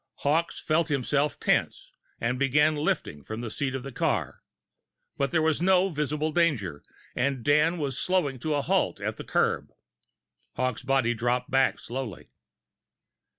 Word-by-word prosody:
Hawkes 160 Hz, +4 st, +1 dB
felt 160 Hz, +1 st, +1 dB
himself 145 Hz, 0 st, 0 dB
tense, -, -, 0 dB, 0.3 s
and 125 Hz, +2 st, -1 dB
began 150 Hz, +3 st, +3 dB
lifting 110 Hz, -, -2 dB
from 110 Hz, -, -6 dB
the 115 Hz, -2 st, -5 dB
seat 135 Hz, +1 st, -2 dB
of 130 Hz, -, -4 dB
the 135 Hz, -, -7 dB
car. -, -, -1 dB, 0.7 s
But 140 Hz, 0 st, 0 dB
there 160 Hz, +3 st, +1 dB
was 160 Hz, 0 st, +1 dB
no 190 Hz, +1 st, +4 dB
visible 150 Hz, -1 st, -1 dB
danger, 130 Hz, -, 0 dB, 0.3 s
and 130 Hz, -1 st, 0 dB
Dan 150 Hz, +5 st, +3 dB
was 140 Hz, -5 st, -2 dB
slowing 175 Hz, -8 st, 0 dB
to 155 Hz, +4 st, -1 dB
a 145 Hz, -, 0 dB
halt -, -, +1 dB
at -, -, -3 dB
the -, -, -6 dB
curb, -, -, 0 dB, 0.9 s
Hawkes' 130 Hz, -3 st, -1 dB
body 135 Hz, -3 st, +2 dB
dropped 120 Hz, +2 st, -1 dB
back 135 Hz, 0 st, +3 dB
slowly. 120 Hz, -6 st, -6 dB
140 Hz, 150 wpm, -27 LUFS, 125-155 Hz, 0.9 s, no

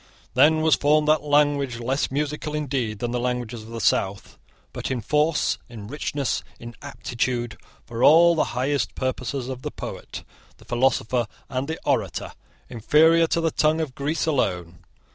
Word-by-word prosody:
Then 155 Hz, +1 st, +5 dB
was 160 Hz, -1 st, +4 dB
formed 150 Hz, +1 st, +3 dB
that 155 Hz, 0 st, +4 dB
language, 145 Hz, -3 st, +2 dB
less 130 Hz, +4 st, -1 dB
musical 150 Hz, +2 st, -3 dB
indeed 130 Hz, -7 st, -2 dB
than 120 Hz, +3 st, -3 dB
the 125 Hz, -, -1 dB
languages 120 Hz, -2 st, -3 dB
of 110 Hz, -, -12 dB
the 115 Hz, 0 st, -6 dB
south, 100 Hz, -1 st, 0 dB, 0.3 s
but -, -, -4 dB
in 130 Hz, -2 st, -1 dB
force, 150 Hz, +6 st, +1 dB
in 110 Hz, -4 st, -9 dB
richness, 140 Hz, +1 st, -2 dB, 0.2 s
in 120 Hz, 0 st, -9 dB
aptitude 120 Hz, -4 st, -3 dB, 0.3 s
for 115 Hz, +1 st, -4 dB
all 170 Hz, +4 st, +7 dB
the 160 Hz, -, +1 dB
highest 130 Hz, -4 st, 0 dB
purposes 130 Hz, 0 st, -3 dB
of 130 Hz, -1 st, -6 dB
the -, -, -4 dB
poet, -, -, -8 dB, 0.3 s
the -, -, -19 dB
philosopher, 120 Hz, -1 st, +1 dB, 0.2 s
and 130 Hz, +2 st, -2 dB
the 160 Hz, +1 st, -3 dB
orator, -, -, -1 dB, 0.3 s
inferior 160 Hz, +8 st, +4 dB
to 165 Hz, -, 0 dB
the 165 Hz, -1 st, +1 dB
tongue 155 Hz, +2 st, +2 dB
of 155 Hz, -5 st, -3 dB
Greece 145 Hz, +6 st, -2 dB
alone. 90 Hz, -, -1 dB
135 Hz, 160 wpm, -24 LUFS, 120-150 Hz, 0.3 s, all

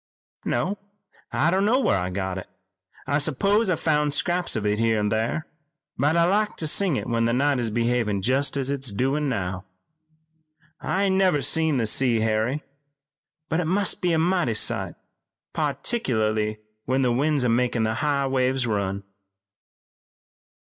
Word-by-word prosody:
"No, 200 Hz, +3 st, -1 dB, 0.5 s
I 165 Hz, -, +2 dB
don't 190 Hz, +2 st, +2 dB
know 225 Hz, +5 st, +3 dB
where 215 Hz, -, +2 dB
I 90 Hz, 0 st, -3 dB
got 95 Hz, 0 st, -3 dB
it. 95 Hz, -, -10 dB, 0.6 s
I 145 Hz, +2 st, +1 dB
s'pose 195 Hz, -, +1 dB
I 180 Hz, -, +2 dB
found 150 Hz, -2 st, +1 dB
scraps 175 Hz, +3 st, 0 dB
here 110 Hz, +1 st, +1 dB
an' 105 Hz, -1 st, 0 dB
thar, 115 Hz, +9 st, -1 dB, 0.5 s
but 145 Hz, +5 st, +1 dB
I 170 Hz, -, +4 dB
like 210 Hz, +4 st, +1 dB
to 160 Hz, -, -1 dB
sing 175 Hz, +1 st, +2 dB
it -, -, -3 dB
when 115 Hz, -1 st, 0 dB
the 115 Hz, -, +1 dB
night 140 Hz, +1 st, +1 dB
is 115 Hz, -2 st, -1 dB
behavin' 115 Hz, -3 st, 0 dB
jest 135 Hz, +4 st, +1 dB
as 135 Hz, 0 st, 0 dB
it's 135 Hz, -4 st, -1 dB
doin' 135 Hz, +7 st, 0 dB
now. 95 Hz, -5 st, -3 dB, 1.2 s
I 195 Hz, +2 st, -1 dB
ain't 190 Hz, -1 st, +2 dB
ever 180 Hz, -7 st, +2 dB
seen 160 Hz, -3 st, +2 dB
the 115 Hz, -, 0 dB
sea, 115 Hz, +1 st, +2 dB
Harry, 110 Hz, +6 st, 0 dB, 0.8 s
but 160 Hz, +2 st, -1 dB
it 175 Hz, -, -1 dB
must 195 Hz, +2 st, +1 dB
be 180 Hz, -2 st, +1 dB
a 165 Hz, -, +2 dB
mighty 170 Hz, -8 st, +1 dB
sight, -, -, 0 dB, 0.6 s
particklarly 110 Hz, -, -1 dB, 0.3 s
when 130 Hz, +1 st, +1 dB
the 125 Hz, -, +2 dB
wind's 140 Hz, +1 st, +1 dB
makin' 120 Hz, 0 st, +1 dB
the 110 Hz, 0 st, 0 dB
high 140 Hz, +1 st, 0 dB
waves 130 Hz, -1 st, 0 dB
run." 100 Hz, -3 st, -2 dB
135 Hz, 160 wpm, -24 LUFS, 110-160 Hz, 1.2 s, I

